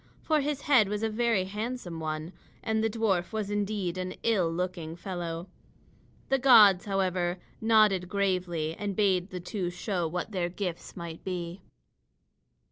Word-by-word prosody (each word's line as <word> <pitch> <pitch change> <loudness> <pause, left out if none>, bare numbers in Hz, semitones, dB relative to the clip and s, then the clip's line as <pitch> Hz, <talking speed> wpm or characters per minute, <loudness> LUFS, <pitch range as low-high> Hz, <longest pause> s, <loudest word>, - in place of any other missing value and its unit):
For 310 -2 +2
his 285 0 -2
head 255 -9 +5
was 210 +1 -2
a 225 - +1
very 230 -3 +2
handsome 210 -3 -5
one, 155 +2 -4 0.3
and 220 0 0
the 225 - +2
dwarf 205 -6 0
was 215 -2 -3
indeed 200 -3 -1
an 185 0 -4
ill 190 -8 +2
looking 170 -2 -3
fellow. 175 -1 -5 0.8
The 270 - +3
gods, 210 -8 +7
however, 185 -3 0 0.2
nodded 215 -5 +4
gravely, 180 -5 0
and 205 -2 -3
bade 190 -3 +2
the 185 - -5
two 180 0 -3
show 180 -1 -2
what 180 +6 -4
their 180 -3 -1
gifts 180 -1 -5
might 170 -2 -7
be. 180 0 -4
190 Hz, 150 wpm, -29 LUFS, 175-215 Hz, 0.8 s, gods